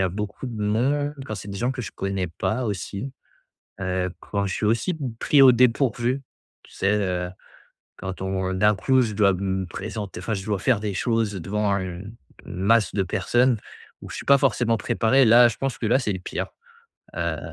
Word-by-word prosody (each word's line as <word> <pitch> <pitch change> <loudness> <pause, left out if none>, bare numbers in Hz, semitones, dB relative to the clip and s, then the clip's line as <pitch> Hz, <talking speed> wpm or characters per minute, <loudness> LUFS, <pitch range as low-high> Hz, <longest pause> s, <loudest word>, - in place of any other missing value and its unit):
a 95 - +2
beaucoup 105 +6 -5
de 115 -3 -6
monde, 135 +8 +1
quand 110 - -5
c'est - - -8
des 100 - -5
gens 120 +4 0
que 130 -2 -4
je - - -7
connais 95 -1 -2
pas 110 +9 -2
aussi. 105 +5 -4 0.7
Heu, 90 -1 -1
quand 100 -1 -2
je 95 - -2
suis 105 - -1
aussi 115 - +1 0.2
pris 140 +2 +4
au 130 - +9
dépourvu, 125 +1 +2 0.4
tu - - -20
sais? 95 +1 +1
Heu, 90 -3 -1 0.7
quand 95 0 -6
on 95 0 -1
d'un 105 +3 +3
coup, 130 +6 +3
je 115 -4 -1
dois 100 -1 +4
me 95 0 -2
présenter, 100 0 -6
enfin 110 +3 -2
je 95 0 -6
dois 105 -2 0
faire 115 +3 +2
des 105 -1 -3
choses, 115 +1 0
heu, - - -4
devant 105 +2 0
une 95 +3 -6 0.3
une - - -8
masse 105 -1 +3
de 100 - +1
personnes 120 +6 +2 0.4
où - - -9
je - - -7
suis - - -7
pas 140 - +6
forcément 120 -3 +2
préparé. 120 +4 +3
Là 120 +1 +7
je 115 - -7
pense 135 -3 -2
que - - -4
là 120 +4 +3
c'est 110 -6 -1
le 95 - -4
pire. 90 - -4 0.7
Heu, - - -1
105 Hz, 205 wpm, -24 LUFS, 95-120 Hz, 0.7 s, au